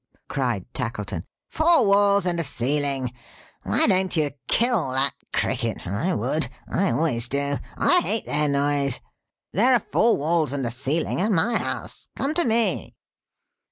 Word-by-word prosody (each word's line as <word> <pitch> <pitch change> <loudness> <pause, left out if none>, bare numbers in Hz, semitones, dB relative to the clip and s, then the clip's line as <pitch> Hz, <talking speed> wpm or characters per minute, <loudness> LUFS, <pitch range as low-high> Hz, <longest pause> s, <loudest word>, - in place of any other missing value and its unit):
cried - - -2
Tackleton. - - -4 0.2
"Four 320 -5 +3
walls 200 -1 +4
and 175 -1 0
a - - +1
ceiling! 135 -1 0 0.5
(why - - +1
don't 185 -2 +2
you 150 -2 +1 0.2
kill 235 - +1
that 135 0 +1 0.2
Cricket; 115 -4 -2
I 100 - -1
would! 130 +8 -1 0.2
I 195 +1 0
always 125 -7 0
do. 140 0 -1 0.2
I 360 - +4
hate 225 - 0
their 150 0 +1
noise.) 140 -1 +1 0.5
There 245 +7 +4
are 235 - 0
four 230 +1 +3
walls 155 -1 0
and 135 -3 -2
a 115 - -2
ceiling 140 +8 -1
at 215 +3 +1
my 200 +6 +2
house. - - -5
Come 275 +3 -1
to 345 +2 +1
me!" 230 -1 0
160 Hz, 155 wpm, -24 LUFS, 140-205 Hz, 0.5 s, walls